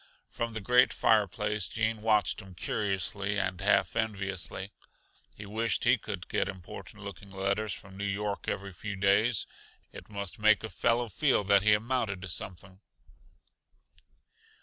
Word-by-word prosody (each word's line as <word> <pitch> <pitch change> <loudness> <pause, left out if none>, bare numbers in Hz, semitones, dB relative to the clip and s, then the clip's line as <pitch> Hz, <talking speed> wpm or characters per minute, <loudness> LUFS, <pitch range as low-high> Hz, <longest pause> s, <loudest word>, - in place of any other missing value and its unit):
From 115 -1 -3
the 110 - -3
great 125 +4 +5
fireplace 105 -1 +2
Gene 110 -1 -1
watched 105 -2 +2
him 95 -2 -13
curiously 100 +1 -1
and 95 -2 -2
half - - +3
enviously. 100 -2 -2 0.6
He 105 - -9
wished 110 +3 0
he - - +6
could - - -6
get - - 0
important 95 +3 -9
looking 100 0 -9
letters 100 +2 -1
from 95 +1 -7
New 100 - -3
York 100 +1 -2
every 100 0 -3
few 105 +4 -5
days. 100 +3 +3 0.5
It - - -11
must 100 -2 -5
make 105 0 +5
a 110 - -5
fellow 115 +6 +2
feel 110 - +2
that 100 0 +5
he 105 +1 +5
amounted 110 -4 -1
to - - -5
something. 95 +2 -6
100 Hz, 150 wpm, -30 LUFS, 95-110 Hz, 0.6 s, he